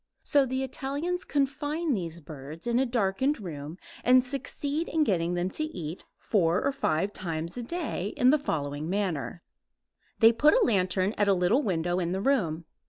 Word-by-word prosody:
So 280 -2 +3
the 260 +1 -1
Italians 285 +7 -3
confine 290 +3 -1
these 170 -5 -4
birds 150 +1 -9
in 240 0 +2
a 265 - +2
darkened 235 +5 +1
room 155 -4 -7 0.3
and 255 0 +6
succeed 285 +4 -3
in 320 -1 +2
getting 175 - 0
them 175 +2 -1
to 310 - -2
eat 175 - -6
four 175 -4 +2
or 275 - +2
five 195 - 0
times 165 -2 -4
a 245 - -4
day 270 - -3
in 250 +1 +5
the 305 - +3
following 145 - -3
manner: 180 -4 -2 0.7
They 225 -1 +7
put 295 +6 +4
a - - +4
lantern 190 -1 +1
at 205 - +3
a 200 - +5
little 180 +9 +3
window 175 - 0
in 175 0 -1
the 190 - -1
room. 180 - +1
200 Hz, 175 wpm, -28 LUFS, 170-275 Hz, 0.7 s, They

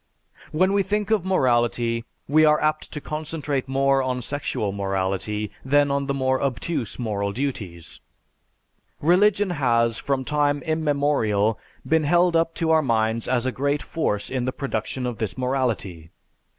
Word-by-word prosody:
When 185 +5 +2
we 200 - +3
think 210 +2 -1
of 210 -5 +2
morality 120 -8 +1 0.2
we 155 +3 +4
are 150 0 +5
apt 155 0 -1
to 150 - -4
concentrate 150 -3 -3
more 135 0 +2
on 130 -1 -2
sexual 135 -7 -2
morality 100 +2 -2
than 145 +1 +3
on 140 0 -1
the 140 - 0
more 130 -1 +1
obtuse 135 -1 -2
moral 100 -4 -2
duties. 100 - -5 1.0
Religion 195 +4 +3
has 115 -7 +2
from 135 -2 -1
time 145 0 +1
immemorial 140 -10 +1 0.3
been 160 -1 +2
held 175 +3 +3
up 165 0 +1
to 165 -2 0
our 160 0 +5
minds 115 -3 0
as 125 -1 +1
a 130 - +1
great 140 +3 -1
force 105 -11 -2
in 130 -2 -1
the 130 - 0
production 130 -1 -3
of 120 -3 -3
this 110 0 -3
morality. 120 -11 -2
135 Hz, 150 wpm, -24 LUFS, 115-155 Hz, 1.0 s, are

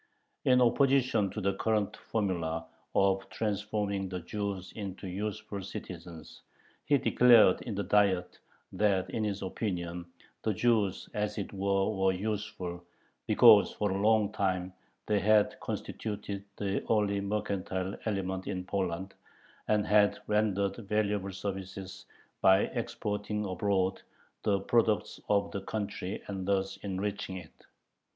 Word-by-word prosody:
In 125 0 +5
opposition 125 -4 +3
to 105 - -5
the 100 -1 +1
current 105 -1 0
formula 85 -8 -2 0.3
of 95 0 +2
"transforming 105 -2 -2
the 90 -1 -4
Jews 100 0 -4
into 100 -2 -6
useful 105 +2 -4
citizens," 85 -3 -9 0.4
he 145 - +4
declared 120 -7 +6
in 110 - -5
the 100 - -1
Diet 95 -3 +2 0.3
that 100 -3 +1
in 110 - -1
his 100 -1 -2
opinion 90 -3 -3 0.3
the 110 -3 0
Jews 110 -3 +1
as 105 0 -2
it 100 - -4
was 100 +1 +1
were 95 -1 +1
useful, 100 -4 -4 0.4
because - - +7
for 105 -2 -1
a 95 +1 -1
long 110 -1 +3
time 95 -3 -1 0.3
they 105 -1 +2
had 105 +1 +3
constituted 100 -2 -5
the 100 -1 -1
only 105 -2 +2
mercantile 100 -2 -2
element 95 -3 -2
in 90 -2 -3
Poland, 95 0 -2 0.5
and 105 -1 +2
had 105 0 +4
rendered 100 -2 +1
valuable 105 -2 -1
services 95 -1 -6 0.3
by 95 0 +6
exporting 105 0 -3
abroad 95 -1 0 0.4
the 100 -2 +1
products 110 0 +1
of 100 -1 +2
the 100 - -4
country 100 -1 -4
and 95 -2 -5
thus 95 -1 0
enriching 100 0 -3
it. 85 -4 -13
100 Hz, 130 wpm, -30 LUFS, 95-105 Hz, 0.5 s, because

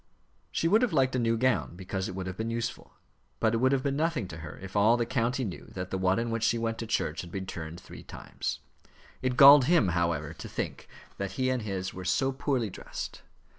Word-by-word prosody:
She 165 - 0
would 210 +6 +4
have 245 -8 +1
liked 130 -3 +2
a - - +1
new 115 -1 +2
gown 110 - +1
because 95 +1 -4
it 95 - -6
would 95 -1 -4
have 95 0 -5
been 110 +3 -3
useful; 115 0 -4 0.4
but 110 -1 +2
it - - +2
would 130 +3 +3
have 135 -1 +1
been 140 -1 0
nothing 155 - 0
to 80 - -7
her 80 -1 -8
if 95 +1 -10
all 110 +4 +5
the 120 - 0
county 125 +2 0
knew 95 -7 -5
that 90 0 -5
the 95 - -1
one 95 +1 +2
in 115 0 -1
which 115 0 -1
she 115 +1 +2
went 115 -1 -2
to 115 - -4
church 80 -6 -1
had 85 - -10
been 95 +1 -4
turned 80 -2 -6
three - - -11
times. - - -5 0.6
It 130 -1 -1
galled 140 -1 +10
him, 155 - +4
however, 85 -3 0
to - - -9
think - - -4 0.3
that 100 -1 -3
he 130 0 0
and 130 -2 -1
his 95 -3 -4
were 95 - -7
so 95 +9 +1
poorly 130 -5 -1
dressed. - - -7
115 Hz, 240 wpm, -29 LUFS, 95-130 Hz, 0.6 s, galled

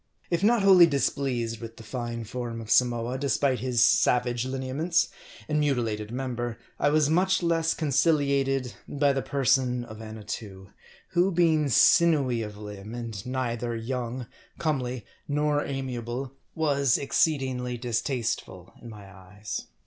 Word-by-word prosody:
If 170 +2 0
not 225 0 +4
wholly 185 -3 +8
displeased 130 -5 -1
with 115 0 -8
the 115 - -11
fine 120 0 -5
form 120 0 -5
of 115 -1 -7
Samoa, 120 +1 +2
despite 140 -2 +1
his 120 -1 +2
savage 125 -7 +3
lineaments, 135 +6 0 0.4
and 150 0 +1
mutilated 115 -7 -1
member, 120 -2 -3 0.2
I - - +3
was 150 -1 +3
much 185 +4 +2
less 165 -1 +1
conciliated 140 -3 +1
by 145 -1 +2
the 135 - -1
person 130 -2 +1
of 110 -1 -10
Annatoo; 105 -3 -8 0.4
who, 180 +1 +2
being 160 -4 +3
sinewy 135 -2 +4
of 105 -1 -6
limb, 105 +1 -8
and 115 -5 -6
neither 120 -2 -2
young, 125 +1 -4 0.3
comely, 130 -6 -2 0.2
nor 150 0 +1
amiable, 130 -1 -4 0.2
was 140 -5 +2
exceedingly 130 -4 0
distasteful 120 +1 -3
in 120 - -10
my 105 -2 -11
eyes. 95 +2 -8
130 Hz, 135 wpm, -27 LUFS, 115-145 Hz, 0.4 s, wholly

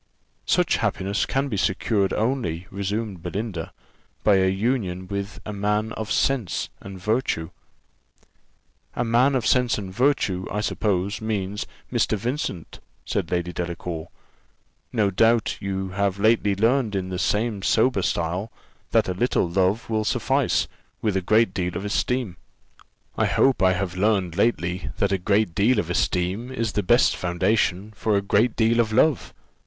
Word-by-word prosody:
"Such - - +3
happiness 100 +2 -1
can 135 +1 0
be 110 -7 -3
secured 95 +1 +1
only," 110 -8 -1
resumed 100 -1 -3
Belinda, 90 -1 -4 0.5
"by 105 -2 +5
a 95 0 +3
union 95 -3 -1
with 100 +1 -4
a 105 - -5
man 105 +2 0
of 110 -1 -5
sense 130 -9 0
and 95 -1 -9
virtue." 105 -5 -1 1.4
"A 120 - 0
man 125 +4 +3
of 125 -4 0
sense 125 -2 +3
and 95 -3 -6
virtue, 110 -7 +1
I 105 - -1
suppose, 100 -1 -1
means 105 -2 -2 0.3
Mr. 110 - +1
Vincent," 115 - -4 0.3
said 95 -5 -2
Lady 90 0 -1
Delacour: 85 -1 -4 0.8
"no 105 -4 +1
doubt 115 +3 +2
you 95 -1 -3
have 100 0 -1
lately 105 -1 +3
learned 115 +1 +2
in 95 -1 -2
the 90 -1 -3
same 105 0 0
sober 110 +1 +2
style 90 +5 -1 0.4
that - - +3
a 90 - -1
little 120 -1 +1
love 95 +5 +1
will 110 -1 0
suffice - - +1 0.4
with 105 -3 +1
a 95 - +1
great 110 +2 +3
deal 90 -1 -2
of 100 - -5
esteem." 120 0 -1 0.8
"I - - +4
hope 135 -5 +3
I 95 -1 +5
have 90 -1 -3
learned 95 -3 +1
lately 90 -6 0
that - - +1
a 95 - +1
great 100 0 +1
deal 110 +8 +3
of 85 - -1
esteem 90 +7 0
is 115 -4 -2
the 105 - 0
best 120 +6 +4
foundation 95 +3 0
for 105 0 +1
a - - +1
great 110 +4 +2
deal 115 +1 +2
of 110 -2 +2
love." 130 +4 +2
100 Hz, 155 wpm, -24 LUFS, 95-115 Hz, 1.4 s, by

